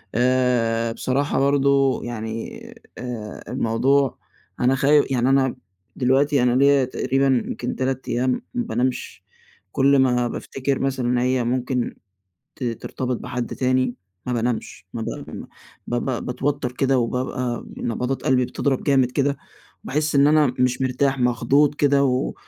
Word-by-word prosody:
آآ، 120 -2 +2
بصراحة 135 +5 -1
برضه 140 -1 +3
يعني 110 -1 -5 0.3
آآ، 120 -4 -6
الموضوع 130 +4 +1 0.4
أنا 125 +2 +3
خاي 145 +2 +4
يعني 125 0 +2
أنا 135 -1 +2 0.4
دلوقتي 135 +1 +2
أنا 125 0 +3
ليّا 140 0 +4
تقريبًا 130 0 +1
يمْكِن 125 - -4
3 130 0 -2
أيام 125 +2 +1 0.2
ما 245 -1 -1
بانامش. 130 - -2 0.5
كُلّ 140 0 +4
ما 125 -2 +3
بافتكر 135 +2 -3
مثلًا 135 -2 -1
إن 125 0 +1
هي 125 0 +1
ممكن 125 +1 -1 0.6
ت - - -7
ترتبط 125 +1 -3
بحد 125 0 -4
تاني 130 -1 +1 0.3
ما 125 - -2
بانامش. 115 -4 -3
ما 115 - -4
ب - - -3 0.2
ما - - -8 0.4
ب 120 - -1
ب 130 -3 -2
باتوتر 135 0 -2
كده 135 0 +1
وبابقى 125 0 -2
نبضات 125 +3 -2
قلبي 125 -1 +3
بتضَرب 135 +1 -1
جامد 130 -3 +3
كده، 140 0 0 0.5
وباحس 150 +1 -1
إن 140 +1 +6
أنا 150 -4 +4
مش 125 0 +1
مرتاح، 135 +1 +1
مخضوض 125 +4 +2
كده، 140 -1 +3
و 130 -1 0
130 Hz, 140 wpm, -22 LUFS, 125-135 Hz, 0.6 s, إن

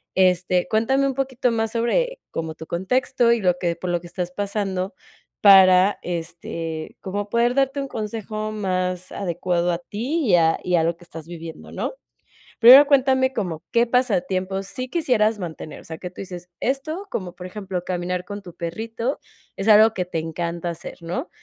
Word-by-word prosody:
Este, 180 -1 +2
cuéntame 265 +6 +2
un 265 - -2
poquito 260 -2 0
más 225 -1 -1
sobre - - 0
como 160 -1 -4
tu 160 - -10
contexto, 235 +6 +1
y 230 - -1
lo 180 -1 +2
que 170 -2 -1
por 180 +1 -5
lo 175 0 +1
que 175 - -10
estás 180 0 -4
pasando 195 -1 -2 0.5
para, 190 -1 +7
este, 165 -2 -5
como 205 +2 -4
poder 240 +3 +2
darte 275 +1 +1
un 275 - -4
consejo 215 0 -4
más 185 -3 -2
adecuado 175 -1 -1
a 170 - -2
ti, 250 - -2
y 180 - +5
a 165 -1 +3
y 180 - +1
a 165 - +3
lo 170 0 0
que 175 - -17
estás 165 -1 -10
viviendo, 165 -2 -9
¿no? - - -3 0.7
Primero, 260 +5 +10
cuéntame 265 -2 +3
como 175 -7 -3
qué 235 0 +3
pasatiempo 195 -6 0
sí 255 +6 -6
quisieras 225 -10 +1
mantener, 160 -3 -7
o - - -17
sea, 160 - -7
que 180 +2 -6
tú - - -9
dices 180 -2 -8
esto, 310 +9 -2
como 180 -3 -4
por 180 - -8
ejemplo, 185 -2 -5
caminar 180 0 -2
con 205 +2 -7
tu 175 - -11
perrito, 225 - -4 0.4
es 195 - -3
algo 215 +1 +7
que 180 -3 -2
te 170 -2 -3
encanta 170 +2 -3
hacer, 170 0 -7
¿no? 170 +1 -4
190 Hz, 180 wpm, -23 LUFS, 175-235 Hz, 0.7 s, Primero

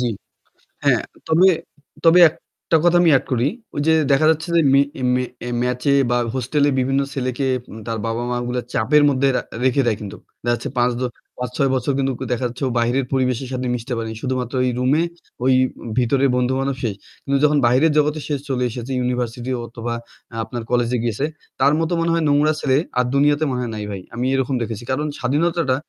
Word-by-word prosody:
জি। 125 - +1 0.8
হ্যাঁ, - - +3 0.3
তবে, 165 +4 +5 0.6
তবে 165 +2 +6
একটা 165 +1 -5
কথা 175 0 +5
আমি 175 - +5
add - - -5
করি। 125 +1 +2 0.3
ওইযে 145 +3 +2 0.2
দেখা 140 +3 +4
যাচ্ছে 160 +1 -2
যে 170 - +5
মে, 135 - +6 0.4
মে 125 - +1 0.4
ম্যাচে 125 +2 0 0.2
বা 120 - +2 0.2
হোস্টেলে 140 +3 +1
বিভিন্ন 135 +2 +1
ছেলেকে 130 0 -2 0.4
তার 115 -1 -2
বাবা-মা 120 +2 -2
গুলা 125 0 -2
চাপের 150 0 +3
মধ্যে 140 0 +2
রা - - +1 0.2
রেখে 130 +2 +3
দেয় 115 -3 +1
কিন্তুক। 100 -2 -8 0.2
দেখা 120 0 +1
যাচ্ছে 145 - -6
৫ 120 0 +3
দ - - -5 0.4
৫-৬ 125 +2 -1
বছর 130 +2 0
কিন্তু 135 -1 +1 0.2
দেখা 125 +1 0
যাচ্ছে 125 +3 -7
ও - - -1
বাহিরের 120 +3 +1
পরিবেশের 130 -1 0
সাথে 130 0 -2
মিশতে 125 +2 -5
পারেনি। 110 -1 -4
শুধুমাত্র 130 -2 -2
ওই 125 - +2
রুমে 135 +5 +2 0.4
ওই 130 - +5 0.4
ভিতরের 130 +2 +2
বন্ধু-বান্ধব 130 +2 0
শেষ। 110 -5 -1 0.3
কিন্তু 140 0 +1
যখন 150 0 +4
বাহিরের 130 +7 +4
জগতে 150 +1 +2
সে 150 - -2 0.2
চলে 125 -2 0
এসেছে 120 +3 -6
ইউনিভার্সিটি 125 0 -2
অথবা 115 0 -5 0.5
আপনার 115 +2 -6
কলেজে 120 0 +1
গিয়েছে 120 +4 -1 0.3
তার 140 +2 +4
মতো 165 +1 0
মনে 165 0 +1
হয় 165 -1 +1
নোংরা 145 +2 +3
ছেলে 135 -3 +2 0.2
আর 125 - +3
দুনিয়াতে 145 +2 +3
মনে 125 -1 -2
হয় 120 -2 -3
নাই 105 -1 -4
ভাই। 95 -2 -5
আমি 120 +2 -2
এরকম 135 0 0
দেখেছি। 115 -1 -4
কারণ 150 +3 -1
স্বাধীনতাটা 150 +1 +1
130 Hz, 185 wpm, -20 LUFS, 120-145 Hz, 0.8 s, তবে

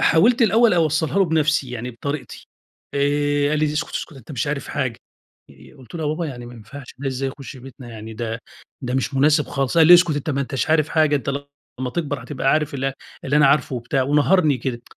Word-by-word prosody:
حاولت 230 +9 +4
الأوّل 225 -1 +4
أوصلّها 160 +2 +1
له 195 - +5
بنفسي، 155 -5 +1
يعني 125 +1 -5
بطريقتي، 130 +1 -6 0.5
آآ، 145 0 +1
قال 155 - +1
لي: 155 - +2
"اسكت 150 - -2
اسكت - - -4
أنت 130 +2 -11
مش 130 +2 -2
عارف 145 -1 -3
حاجة"، 130 -6 -2 0.8
قلت 130 +5 -15
له: 160 - -4
"يا 150 - -1
بابا 160 +2 -2
يعني 120 -4 -7
ما 120 - -11
ينفعش 120 +4 -11
ده 140 -1 -3
ازاي 135 +1 -2
يخش 135 +1 -9
بيتنا 130 -1 -12
يعني 110 0 -9
ده 115 0 -4 0.4
ده 125 0 -3
مش 135 +1 -1
مناسب 150 +2 +3
خالص"، 135 +3 -2
قال 160 - +7
لي: 175 - +10
"اسكت 175 -4 +4
أنت 145 +2 -3
ما 140 0 -1
أنتش 135 +2 -2
عارف 155 -1 +3
حاجة 155 -2 +3
أنت 135 0 -3 0.5
لمّا 125 -1 -2
تكبر 145 0 -3
هتبقى 135 -2 -1
عارف 150 -2 0
ال 135 0 -1 0.3
اللي 140 +2 +1
أنا 150 -2 +6
عارفُه"، 135 -2 +2
وبتاع 130 +3 -1
ونهَرني 150 +1 +3
كده، 120 -1 -4
145 Hz, 215 wpm, -21 LUFS, 130-155 Hz, 0.8 s, لي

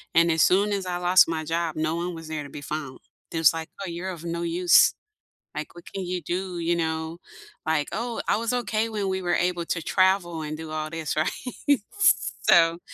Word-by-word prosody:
And 170 0 +5
as 160 - +2
soon 200 +3 +4
as 195 -2 -2
I 175 - -2
lost 180 +1 +5
my 160 -1 -2
job, 165 0 -1
no 155 0 0
one 175 +1 -3
was 165 -1 -9
there 155 -1 -4
to 140 - -10
be 145 - -8
found, 145 -2 -5 0.3
just 160 -2 +4
like, 160 -1 -5
"Oh, 190 - -4
you're 175 +3 -4
of 170 -3 -7
no 170 0 -3
use. 170 +1 +5 0.6
Like, 155 - -5
what 175 0 -12
can 195 -1 -4
you 180 0 -3
do?" 180 +2 -3
You 170 +1 +1
know, 160 0 -2 0.5
like, 155 -2 +1
"Oh, 235 +2 -3
I - - +3
was 230 +2 -1
okay 225 -2 0
when 210 -3 -2
we 190 0 -1
were 175 -1 +1
able 175 -1 0
to 165 0 -2
travel 185 -2 +2
and 155 0 -4
do 160 0 -7
all 155 0 -3
this." 165 -2 -3
Right. 155 +2 +1 0.4
S 285 - +3 0.2
so 165 0 +6
170 Hz, 220 wpm, -25 LUFS, 160-185 Hz, 0.6 s, so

